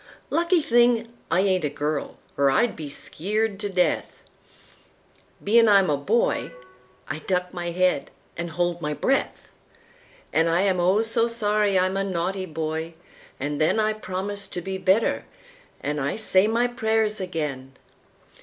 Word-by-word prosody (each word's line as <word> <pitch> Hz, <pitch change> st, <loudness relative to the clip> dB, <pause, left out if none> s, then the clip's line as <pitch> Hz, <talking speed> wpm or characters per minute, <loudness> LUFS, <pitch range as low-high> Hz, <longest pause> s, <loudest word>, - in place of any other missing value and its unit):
Lucky 340 Hz, -1 st, +2 dB
thing 235 Hz, -1 st, +3 dB, 0.2 s
I 180 Hz, +3 st, +3 dB
ain't 190 Hz, -3 st, +1 dB
a 150 Hz, -, +1 dB
girl 150 Hz, +1 st, -3 dB, 0.2 s
or 140 Hz, -1 st, +3 dB
I'd 235 Hz, -, +2 dB
be 150 Hz, -2 st, -7 dB
skeered 205 Hz, +8 st, -2 dB
to 205 Hz, -, -3 dB
death! 180 Hz, -2 st, 0 dB, 1.2 s
Bein' 230 Hz, +2 st, +5 dB
I'm 195 Hz, -5 st, +5 dB
a -, -, +3 dB
boy, 200 Hz, +12 st, 0 dB, 0.6 s
I 155 Hz, -, -4 dB
duck 180 Hz, +2 st, -2 dB
my 175 Hz, -1 st, -3 dB
head 180 Hz, -3 st, +1 dB, 0.3 s
an' 170 Hz, +1 st, -4 dB
hold 175 Hz, +1 st, -1 dB
my 150 Hz, -1 st, -2 dB
breath. 270 Hz, -, -1 dB, 0.8 s
An' 160 Hz, +1 st, +3 dB
I 165 Hz, +2 st, +2 dB
am, 190 Hz, -2 st, +2 dB
oh 185 Hz, +5 st, +3 dB
so 225 Hz, +1 st, +1 dB
sorry 210 Hz, -3 st, +1 dB
I'm 185 Hz, +1 st, +1 dB
a 195 Hz, -, +1 dB
naughty 185 Hz, 0 st, -2 dB
boy, 160 Hz, +1 st, -4 dB, 0.4 s
an' 145 Hz, +1 st, -3 dB
thenI 215 Hz, +7 st, +2 dB
promise 200 Hz, +2 st, -4 dB
to -, -, -5 dB
be 190 Hz, +2 st, -5 dB
better 190 Hz, +4 st, +2 dB, 0.6 s
an' 150 Hz, 0 st, -2 dB
I 140 Hz, 0 st, -1 dB
say 210 Hz, -2 st, +3 dB
my 230 Hz, +2 st, +2 dB
prayers 220 Hz, -3 st, 0 dB
again! 150 Hz, -7 st, -4 dB
185 Hz, 150 wpm, -24 LUFS, 165-215 Hz, 1.2 s, Bein